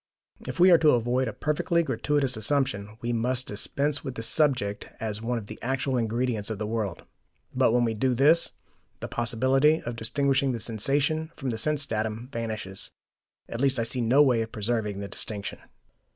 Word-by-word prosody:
If - - -5
we 180 +1 +7
are 170 - +7
to 155 -2 +5
avoid 125 +2 0
a - - -2
perfectly 170 +3 0
gratuitous 135 -1 0
assumption, 110 -3 -1
we 120 0 -1
must 125 +2 0
dispense 140 +7 -1
with 130 -3 -5
the 115 - -4
subject 125 -8 +1
as 110 -1 -3
one 120 +1 -1
of 110 - -6
the 110 +1 -10
actual 135 +1 -1
ingredients 115 -2 -1
of 110 - -3
the 105 - -3
world. 105 -5 -3 0.5
But - - +3
when 120 +1 +3
we 115 -1 +1
do 125 +3 +1
this, 150 +6 +4 0.5
the - - -5
possibility 130 +6 +2
of 120 0 -4
distinguishing 135 +3 +1
the 120 - -3
sensation 140 +8 0
from 130 -2 -3
the 110 - -3
sense 150 +3 +2
datum 110 0 -3
vanishes; 110 -5 -5 0.6
at 115 - -5
least 135 -1 +2
I 115 - +1
see 125 +2 -3
no 130 +6 +5
way 125 -5 +3
of 110 0 -4
preserving 105 -2 -2
the 100 - -4
distinction. 100 +1 -2
120 Hz, 185 wpm, -27 LUFS, 110-135 Hz, 0.6 s, we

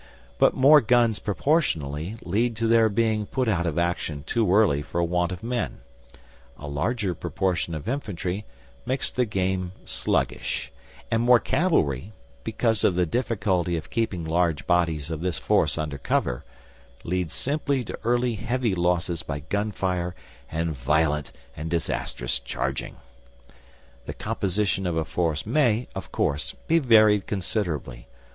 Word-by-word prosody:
But - - +5
more 145 +3 +7
guns 120 -1 +3
proportionally 95 - 0
lead 110 +7 0
to 115 +1 -1
their 115 -1 +5
being 110 0 +1
put 130 -2 -1
out 85 -5 +1
of 80 - -2
action 85 -4 -1
too 110 +1 +1
early 95 -8 +4
for 85 +3 -2
want 90 +1 0
of 90 +1 -6
men; 120 - -3 0.8
a 70 - -8
larger 95 - -1
proportion 85 0 -2
of 80 +6 -7
infantry 105 -7 -3 0.4
makes 130 +2 0
the 125 - +1
game 95 -3 -1
sluggish, 60 0 -1 0.4
and 115 - +2
more 120 0 +6
cavalry 105 - +1 0.3
because 115 - +1
of 90 - +3
the 90 0 +2
difficulty 95 -5 0
of 80 - -8
keeping 105 -8 -1
large 85 -1 +1
bodies 80 -3 +1
of 80 -1 -4
this 90 -2 -1
force - - +2
under 75 -2 -3
cover 60 -2 0 0.6
leads 90 -2 -2
simply 140 -2 0
to - - -7
early 120 +1 +2
heavy 115 0 -1
losses 85 -1 0
by 70 -2 -5
gunfire 90 0 -2 0.4
and 80 +1 -1
violent 75 +2 0 0.2
and 80 +2 -5
disastrous 80 -7 -1
charging. - - -3 1.1
The - - -5
composition 100 -3 -1
of 85 -2 -1
a 80 - 0
force 80 -1 -1
may, 120 -1 +2
of 95 -3 -7
course, 70 +2 -1
be 165 +1 +4
varied 110 -7 +5
considerably. 95 - -2
95 Hz, 140 wpm, -25 LUFS, 80-115 Hz, 1.1 s, more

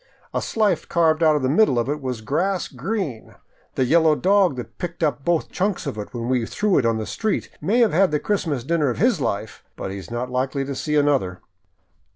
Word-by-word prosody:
A - - 0
slice 210 -7 +1
carved 160 -1 +2
out 155 -2 +5
of 145 - -1
the - - +2
middle 145 - +3
of 120 0 +1
it 150 +1 -2
was 125 -4 -4
grass 180 - -1
green. 150 - -4 0.4
The 130 - +2
yellow 160 +2 +4
dog 190 -3 +3
that 125 - -8
picked 175 -2 -4
up 140 -3 0
both 170 0 0
chunks 195 0 -1
of - - -3
it 105 - -6
when 120 -1 -4
we 125 -2 +1
threw 210 -3 +1
it 125 - 0
into 115 -1 +2
the 110 - -3
street 215 - -2
may 210 +11 +2
have 225 -7 +3
had 190 +4 +4
the 150 -1 0
Christmas 160 - -1
dinner 155 0 +1
of 120 - -3
his - - +2
life, - - -3
but 95 - -5
he 100 - -5
is 95 - -11
not 120 +2 -4
likely 135 +2 -1
to 140 - -4
see 150 +3 -2
another." 140 -12 +1
150 Hz, 225 wpm, -22 LUFS, 125-175 Hz, 0.4 s, out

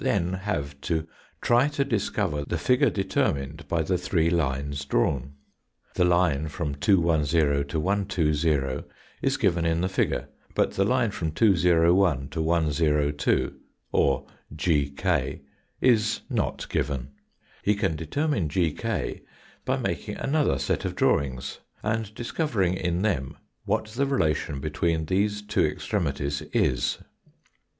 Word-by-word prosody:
Gi - - -5
then 90 -2 +1
have 75 -8 -3
to 80 +3 -1 0.4
try 120 +4 +4
to 145 -2 -1
discover 100 - -1
the 85 +4 -2
figure 125 - +3
determined 80 -7 -1
by 80 +1 +1
the 90 +2 0
three 85 -2 +1
lines 70 -3 -1
drawn. 70 0 0 0.6
The 90 - +2
line 85 -4 +2
from 75 -1 -3
210 75 -3 +2
to 80 +3 -2
120 80 -7 0 0.3
is 135 +1 +1
given 90 -9 +2
in 85 0 +1
the 90 - +1
figure, 95 - 0 0.3
but - - +2
the 95 - +1
line 125 -1 +2
from 80 -5 -2
201 85 - +3
to 80 +3 -3
102 75 -3 +1 0.4
or 70 -2 +2 0.3
GK 70 -4 0 0.4
is 110 -4 +3
not - - -1
given. 70 -3 -2 0.5
He 105 - +2
can 90 -5 0
determine 95 - -1
GK 80 -1 -1 0.4
by - - +1
making - - -3
another 145 - +1
set 70 - -1
of - - -3
drawing^ 70 -1 0 0.2
and 110 -1 -1
discovering 115 - 0
in 90 0 -1
them 75 -12 -1 0.3
what 110 - 0
the 135 +6 0
relation 75 - 0
between 80 +2 -1
these 105 +4 0
two 105 - +1
extremities 75 - -1
is. 65 - +1
85 Hz, 130 wpm, -26 LUFS, 70-100 Hz, 0.6 s, try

